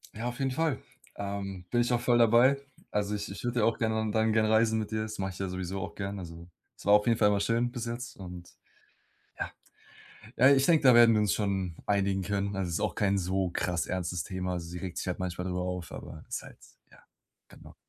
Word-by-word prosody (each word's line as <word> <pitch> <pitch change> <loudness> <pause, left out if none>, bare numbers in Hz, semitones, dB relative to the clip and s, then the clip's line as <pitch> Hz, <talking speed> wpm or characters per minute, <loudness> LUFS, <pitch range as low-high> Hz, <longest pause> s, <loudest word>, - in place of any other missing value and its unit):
Ja, 115 +2 -3
auf 120 0 -4
jeden 135 -1 0
Fall, 155 -1 0 0.4
ähm, 100 -2 -5
bin 120 - +3
ich 120 - 0
auch 120 - +2
voll 120 0 +3
dabei, 120 +4 +5 0.3
also, 105 0 0
ich 100 -1 -5
ich - - -8
würde 120 -1 0
ja - - +4
auch 115 - +1
gerne 110 -1 0
dann 110 +1 +2
gerne 110 0 +2
reisen 110 0 +4
mit 110 -1 -3
ihr, 110 0 -1
das 110 0 -5
mach 95 0 -2
ich 90 - -11
ja 95 - -2
sowieso 95 +1 -4
auch - - -6
gern, 100 0 -4
also, 85 -1 -9 0.3
es - - -14
war 100 - +5
auf 105 +1 +5
jeden 115 -1 +3
Fall 105 - +4
immer 100 -1 +2
schön 115 +4 +1
bis 120 -1 -5
jetzt 120 +2 -5
und 90 -2 -9 0.9
ja, - - -2 0.9
ja, 130 +3 +7
ich 135 -1 +5
denke, 165 -3 +4
da 130 -3 +7
werden 120 -1 +7
wir 105 - +3
uns 105 -4 +2
schon 95 -5 -1
einigen 100 -1 +1
können, 100 +1 -2
also, 95 - -1
es 85 - -3
ist - - -1
auch - - -1
kein 100 -1 +2
so 95 0 0
krass 85 0 -1
ernstes 90 -1 -2
Thema. 90 -1 -3
Sie 85 +1 -7
regt 90 -1 -5
sich - - -4
halt 90 0 -3
manchmal 90 0 -3
darüber 90 -1 -2
auf, 90 -1 -4
aber 80 - -9
ist - - -4
halt - - -13 0.3
ja, - - -19 0.5
genau. - - -15
100 Hz, 240 wpm, -29 LUFS, 90-115 Hz, 0.9 s, ja